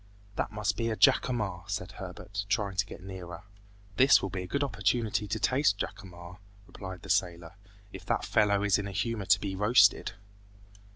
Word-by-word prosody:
"That - - -2
must 105 -1 -1
be 115 -1 -1
a 110 - -1
jacamar," 105 - +2
said - - -3
Herbert, 100 0 -7
trying 100 -2 0
to 100 +2 +1
get - - -10
nearer. 90 -3 -8 0.5
"This 135 +2 +7
will 95 - -4
be 95 0 -3
a 90 - -7
good 140 +8 -1
opportunity 105 -2 0
to 110 +2 -2
taste 130 -4 +2
jacamar," 90 -3 -8 0.3
replied 95 -2 -9
the 95 - -11
sailor, 85 -3 -1 0.4
"if - - -9
that - - 0
fellow 100 -1 +2
is 100 -1 +3
in 100 - -4
a - - -6
humor 110 +1 -2
to 90 - +4
be 95 -2 -4
roasted!" 105 0 +4
100 Hz, 180 wpm, -29 LUFS, 95-110 Hz, 0.5 s, This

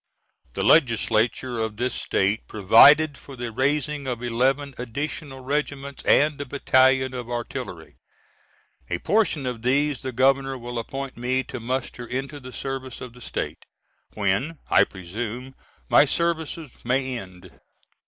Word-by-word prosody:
The - - -2
Legislature 120 -2 +3
of 110 -1 -2
this 125 +1 -1
State 100 +3 0
provided 140 +9 +6
for 135 - -11
the 120 -2 -5
raising 140 +3 0
of 125 -1 -3
eleven 135 +4 0
additional 135 +2 -5
regiments 140 0 -3
and 145 -1 +4
a - - -4
battalion 130 -1 +3
of 125 -2 -6
artillery; 120 -1 -6 0.9
a 85 - -1
portion 170 - +1
of 125 -3 -3
these 140 +3 +1
the 130 - -4
Governor 135 +2 +2
will 120 -1 -5
appoint 135 +3 -6
me 130 +2 0
to 125 - -7
muster 125 0 -4
into 135 +4 -4
the 130 -1 -10
service 130 -1 -5
of 125 -2 -8
the 125 - -15
State, - - -4 0.5
when 105 +11 0
I - - +6
presume 110 +8 -6 0.3
my - - +6
services 160 -4 -2
may 130 +1 0
end. 95 -1 -12
130 Hz, 140 wpm, -24 LUFS, 120-140 Hz, 0.9 s, provided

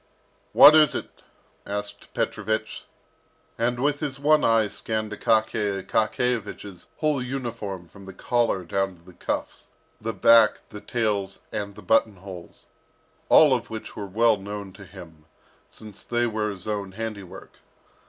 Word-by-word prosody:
"What 145 +2 +9
is 155 -3 +5
it?" - - -7 0.4
asked 105 0 -6
Petrovich, 110 0 -2 0.7
and 120 +1 -1
with 145 +2 0
his 140 -3 -3
one 150 +1 +4
eye 115 -2 +3
scanned 110 +1 -4
Akaky 105 -2 0
Akakiyevich's 110 -5 -2
whole 150 -4 0
uniform 115 -8 -5
from 100 +3 -15
the 95 - -9
collar 115 -2 0
down 95 +1 -1
to 85 - -23
the 90 +1 -16
cuffs, - - -4 0.3
the 115 +1 -2
back, 115 -1 +5
the 105 - -9
tails 105 -5 -2
and 100 -1 -4
the 105 - -12
button 110 -2 +2
holes, 90 -2 -11 0.6
all 150 -4 +7
of 120 -2 -2
which 110 -1 -7
were 100 -2 -6
well 110 +3 +3
known 100 -1 -7
to 100 +1 -13
him, 85 -5 -13 0.4
since 105 -3 -12
they 120 0 -1
were 110 -2 -1
his 95 -1 -7
own 100 -3 -3
handiwork. 105 -3 -8
110 Hz, 145 wpm, -25 LUFS, 100-115 Hz, 0.7 s, What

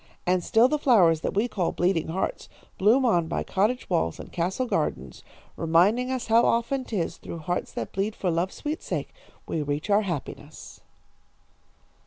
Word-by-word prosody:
"And 180 0 +1
still 225 +7 +4
the 300 +3 -1
flowers 180 - +4
that - - -3
we 210 +4 +2
call 190 -7 -1
bleeding 175 -2 +1
hearts 190 - -3 0.3
bloom 230 +7 +4
on 175 -8 +2
by 170 - -2
cottage 215 +6 0
walls 165 - 0
and - - -9
castle 185 +9 -1
gardens, 250 - -3 0.3
reminding 185 +10 +2
us 260 -2 -2
how 230 +1 +4
often 245 +3 +1
'tis 205 -9 -3
through - - -8
hearts 175 +3 -3
that - - -5
bleed 200 +3 -2
for 180 - -1
love's 170 +3 -1
sweet 305 +1 -4
sake - - -4 0.3
we 160 - -2
reach 145 +7 -3
our 205 +1 +5
happiness." 170 -9 -7
195 Hz, 170 wpm, -26 LUFS, 170-235 Hz, 0.3 s, our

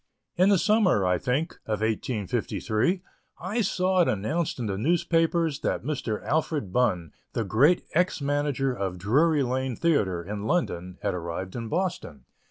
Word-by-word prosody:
In 185 +2 +4
the 200 - +5
summer, 195 - +3
I 90 -1 +2
think, 145 +7 -1
of 110 -2 -1
1853, 110 - -1 0.4
I 200 +7 -1
saw 185 -2 +2
it 170 - +3
announced 145 - -1
in 120 - -3
the 100 -2 -2
newspapers 165 - +1
that - - -2
Mr. 130 -8 -3
Alfred 150 - -1
Bunn, 90 -10 +1 0.2
the 115 - 0
great 135 - +3
ex 180 +2 +1
manager 140 -2 0
of 95 -6 -3
Drury 140 - +3
Lane 130 0 -1
Theatre, 100 - +1
in 105 +3 -5
London, 90 - -1
had 100 - 0
arrived 90 +2 -5
in 115 -2 -4
Boston. 165 - -3
130 Hz, 155 wpm, -26 LUFS, 100-170 Hz, 0.4 s, the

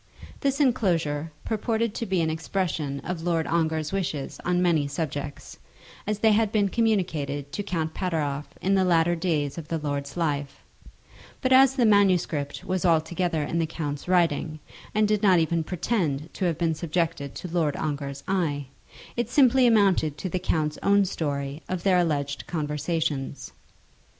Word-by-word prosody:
This 275 0 0
enclosure 165 - +1
purported 225 0 -1
to 230 - -4
be 190 -2 +1
an 160 -1 +1
expression 160 -4 -2
of 180 -2 -4
Lord 165 -1 0
Ongar's 160 -2 0
wishes 165 -8 -3
on 180 0 +1
many 165 -5 +2
subjects, 145 -1 -5 0.5
as 210 0 0
they 220 +1 +4
had 215 0 +2
been 205 -3 +2
communicated 160 -11 0
to - - -3
Count 165 -5 -2
Pateroff 150 -6 -2 0.2
in 195 - +2
the 190 -1 +4
latter 175 -1 +3
days 160 -4 -1
of 155 - -9
the 165 - -1
lord's 145 -1 -4
life; 145 -4 -2 0.8
but 260 0 +2
as 265 0 +6
the 250 -3 +3
manuscript 185 -8 +2
was 185 0 -1
altogether 165 -1 +1
in 170 +3 -1
the 165 - +1
count's 145 -2 -5
writing, 165 -3 +1 0.4
and 215 0 +4
did 210 -1 +1
not 190 -4 +5
even 165 0 +1
pretend 160 -4 -2
to 190 - -2
have 170 -4 0
been 165 -1 +1
subjected 160 -3 -2
to - - -6
Lord 165 -4 0
Ongar's 140 -2 -4
eye, 160 -7 0 0.5
it 240 - -1
simply 260 -2 +5
amounted 195 -9 +3
to 185 - -4
the 185 - -1
count's 155 -4 -1
own 200 0 +4
story 140 -3 -3
of 185 -2 -3
their 185 -2 +4
alleged 145 -5 -1
conversations. 150 -3 -2
165 Hz, 160 wpm, -26 LUFS, 150-190 Hz, 0.8 s, as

